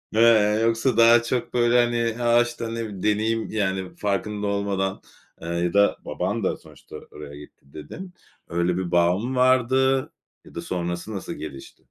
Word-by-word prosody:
aaa, - - +2
ya 110 -2 +5
yoksa 115 +2 +1
daha 115 0 +6
çok 125 +1 -3
böyle 120 0 +4
hani 120 0 -2
a, 120 0 +4
işte 120 -1 -4
ne - - -4
bileyim 110 -5 -5
deneyim 110 +2 0
yani 95 -3 -2
farkında 105 0 -2
olmadan, 100 -1 -2 0.4
eee, 85 - -7
ya 85 +1 -1
da 100 0 +3
baban - - -3
da - - -1
sonuçta - - -15 0.2
oraya 75 -1 -10
gitti 75 -1 -16
dedin, 180 - -9 0.4
yle 85 +1 0
bir 90 -2 -3
bağ 85 +1 +3
mı 125 +5 -4
vardı 130 +1 +3 0.5
ya - - -16
da 85 - -4
sonrası 85 +4 -4
nasıl 95 - -5
gelişti? 65 -1 -10
105 Hz, 170 wpm, -23 LUFS, 90-120 Hz, 0.5 s, daha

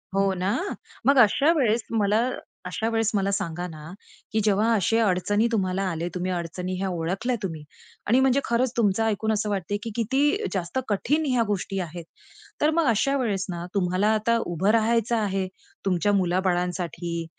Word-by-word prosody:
हो 195 -1 +2
ना, 185 +2 -1 0.6
मग 280 -1 +5
अशा 275 +8 +5
वेळेस 240 -7 +2
मला 220 +2 +2 0.4
अशा 220 +5 -2
वेळेस 225 -1 +1
मला 200 0 +1
सांगा 175 -2 -2
ना, 155 -3 -10 0.5
की 220 - +1
जेव्हा 215 +2 +2
अशा 225 +3 +2
अडचणी 205 +5 +1
तुम्हाला 190 -2 0
आले, 170 0 -3
तुम्ही 180 +1 -2
अडचणी 180 +1 -3
ह्या 190 +1 -2
ओळखल्या 185 +8 -1
तुम्ही 160 -5 -4 0.4
आणि 245 +4 +4
म्हणजे 265 0 +3
खरंच 235 +1 +1
तुमचं 220 -1 +2
ऐकून 220 0 0
असं 210 0 -1
वाटतंय, 200 0 -2
की 230 - -4
किती 285 - +1
जास्त 190 +7 -2
कठीण 290 +10 +1
ह्या 250 -4 +2
गोष्टी 195 -1 -2
आहेत. 170 -1 -5 0.6
तर 300 - +4
मग 330 -1 +2
अशा 275 +6 +1
वेळेस 205 -7 -1
ना, 175 0 -4
तुम्हाला 185 0 +1
आता 230 +2 +2
उभं 175 +4 0
राहायचं 230 +1 +2
आहे, 195 -3 -1 0.4
तुमच्या 195 +2 +2
मुलाबाळांसाठी 175 -2 -1
200 Hz, 165 wpm, -25 LUFS, 180-230 Hz, 0.6 s, मग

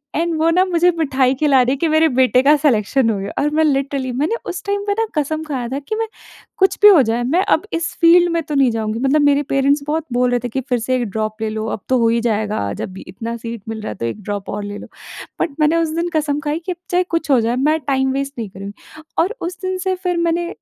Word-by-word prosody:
And 335 +1 0
वो 325 +1 +3
ना 365 +3 +3
मुझे 355 -1 +3
मिठाई 265 -4 +2
खिला 275 -4 +5
रही 250 +1 +1
है - - -3
कि 330 - 0
मेरे 315 +1 +3
बेटे 255 0 +4
का 295 +2 +6
सिलेक्शन 255 -3 +2
हो 210 - 0
गया। 195 - -5
और 295 - +2
मैं - - +5
लिटरली 275 -2 0
मैंने 300 - -1
उस 350 - -5
टाइम 405 0 -1
पे 405 - +2
ना - - +1 0.2
कसम 310 +2 -3
खाया 255 -5 -3
था 275 +2 -3
कि 360 +10 -5
मैं 450 0 -2 0.5
कुछ 385 0 +3
भी 415 - +9
हो 345 -8 +7
जाए, 230 +2 -1
मैं 335 +10 +1
अब - - +1
इस 330 -1 -2
फील्ड 345 +1 +6
में 335 - +1
तो 300 -1 -4
नहीं 265 -3 +4
जाऊँगी। 220 0 -2
मतलब 275 +3 +2
मेरे 285 0 +3
पेरेंट्स 280 +1 +2 0.3
बोल 250 0 +2
रहे 245 - +2
थे 245 - -3
कि, 265 +4 -2
"फिर 250 -2 -1
से 255 +3 -1
1 245 - 0
ड्रॉप 215 +1 -4
ले 220 - -1
लो, 215 0 -4
अब 210 - -4
तो 260 - +3
हो 230 - +3
ही 230 0 +1
जाएगा, 210 - -1
जब 185 - -6
इतना 230 +4 -6
सीट 230 -2 -7
मिल 220 -1 -5
रहा - - -5
है - - -7
तो 115 - -4
1 210 - -4
ड्रॉप 205 -1 -5
और 205 0 -4
ले 205 0 -6
लो" - - -10 0.5
बट - - +1
मैंने 305 +2 +3
उस 330 -1 +1
दिन 340 +1 -1
कसम 295 -2 0
खाई 295 +2 -2
कि 370 - -2
अब - - -21
चाहे 360 +1 +3
कुछ 330 -2 -2
हो 255 - +5
जाए, 235 +2 0
मैं 305 +5 +1
टाइम 265 -1 +1
वेस्ट 275 +1 -3
नहीं 215 -4 -4
करुँगी। 200 +11 -11 0.2
और 400 +8 +1
उस 350 +1 -4
दिन 370 0 -2
से 375 0 -1
फिर 360 -1 -2
मैंने 340 0 0
275 Hz, 270 wpm, -19 LUFS, 230-330 Hz, 0.5 s, भी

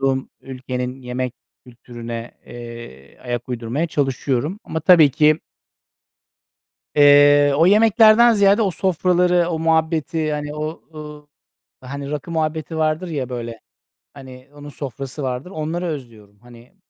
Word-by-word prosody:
bulunduğum 135 -1 -1
ülkenin 130 0 -6
yemek 125 0 -4 0.3
kültürüne, 120 -1 -8 0.2
eee, 115 - -11
ayak 120 -1 -5
uydurmaya 125 +6 -3
çalışıyorum 140 - -2
ama, 160 - -4
tabii 160 -3 +6
ki 155 +1 +3 1.6
eee, 145 0 +6
o 165 +3 +4
yemeklerden 220 +3 +5
ziyade 200 +2 +4
o 195 - +1
sofraları, 180 -1 +1
o 165 -2 -2
muhabbeti, 160 -1 0
hani, 150 0 -4
o, 155 +2 -5
ııı, 150 -1 -10 0.5
hani, 140 +2 -7
rakı 150 +3 -5
muhabbeti 160 -1 -3
vardır 155 +3 -1
ya, 140 -6 -4
böyle, 115 -3 -6 0.5
hani, 130 -1 -13
onun 145 0 -11
sofrası 140 0 -7
vardır, 130 +6 -4
onları 165 +1 -4
özlüyorum. 115 -9 -8
Hani, 120 - -17
145 Hz, 125 wpm, -20 LUFS, 125-160 Hz, 1.6 s, tabii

